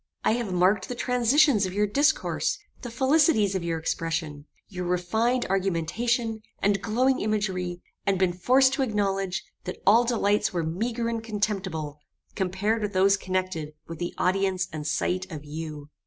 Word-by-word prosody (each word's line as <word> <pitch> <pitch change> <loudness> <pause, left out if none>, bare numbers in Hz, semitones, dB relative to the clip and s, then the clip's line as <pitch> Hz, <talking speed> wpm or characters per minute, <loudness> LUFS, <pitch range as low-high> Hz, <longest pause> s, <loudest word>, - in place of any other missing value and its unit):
I - - +3
have 230 -3 -1
marked 185 +2 +2
the 250 - -3
transitions 250 -2 +3
of 185 - -7
your 210 +1 +3
discourse, 285 +9 +1 0.2
the 245 - -6
felicities 265 - +3
of 190 -2 -2
your 165 -1 -1
expression, 160 -2 -3 0.2
your 180 -2 -5
refined 220 +8 +1
argumentation, 215 +5 0 0.2
and 200 -1 +1
glowing 255 +5 +1
imagery; 185 -5 -2 0.2
and 195 -1 +1
been 185 -1 +2
forced 260 +9 +4
to 270 - 0
acknowledge, 195 -5 -1 0.2
that - - -5
all 225 +4 +6
delights 210 -4 +1
were 175 -2 -1
meagre 225 +9 -2
and 230 -1 -2
contemptible, 190 -9 -3 0.3
compared 200 +4 -1
with 210 -1 -2
those 195 +1 +4
connected 185 -5 -3
with 165 -1 -8
the 175 0 -4
audience 190 0 +1
and 150 -1 -4
sight 185 +4 -1
of 150 -2 -7
you. 150 -1 -7
195 Hz, 155 wpm, -26 LUFS, 180-230 Hz, 0.3 s, all